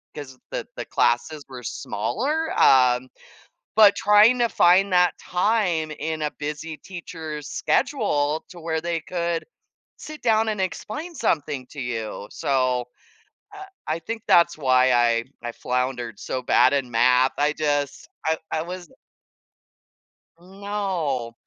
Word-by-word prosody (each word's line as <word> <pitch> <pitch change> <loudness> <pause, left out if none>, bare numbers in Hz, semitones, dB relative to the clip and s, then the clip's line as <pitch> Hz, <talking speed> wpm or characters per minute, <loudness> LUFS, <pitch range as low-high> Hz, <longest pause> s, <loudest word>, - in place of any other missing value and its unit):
'cause 135 -3 -9
the - - -3
the - - -4
classes 145 +5 0
were 125 -1 -8
smaller, 280 - -2
um, 125 -1 +5 0.7
but 205 -2 +8
trying 210 +4 +5
to 235 -1 +3
find 185 +2 +4
that 180 0 +4
time 180 -5 0
in 155 +1 -4
a 150 - 0
busy 150 +2 -5
teacher's 160 -5 -8
schedule 155 - 0
to 175 -2 -11
where 160 -1 -2
they 170 -1 -2
could 170 -1 -2 0.5
sit 310 0 -10
down, 220 -1 +3
and 210 -3 -2
explain 220 - -4
something 145 - -1
to 145 - -8
you, 115 -4 -5
so, 130 -2 0 0.7
uh, 385 - -8 0.2
I 155 +2 0
think 225 +5 -6
that's 170 -1 +5
why 130 -2 +4
I 120 -1 +3 0.2
I 120 - -4
floundered 125 -3 -3
so 130 - -3
bad 125 +1 +4
in 140 -3 0
math, 125 +3 +4
I 150 +1 +2
just 145 -2 -2 0.2
I 160 0 +1
I 155 - 0
was, 180 0 -7
uh - - -21 1.5
No, 185 - -3
155 Hz, 135 wpm, -23 LUFS, 130-190 Hz, 1.5 s, but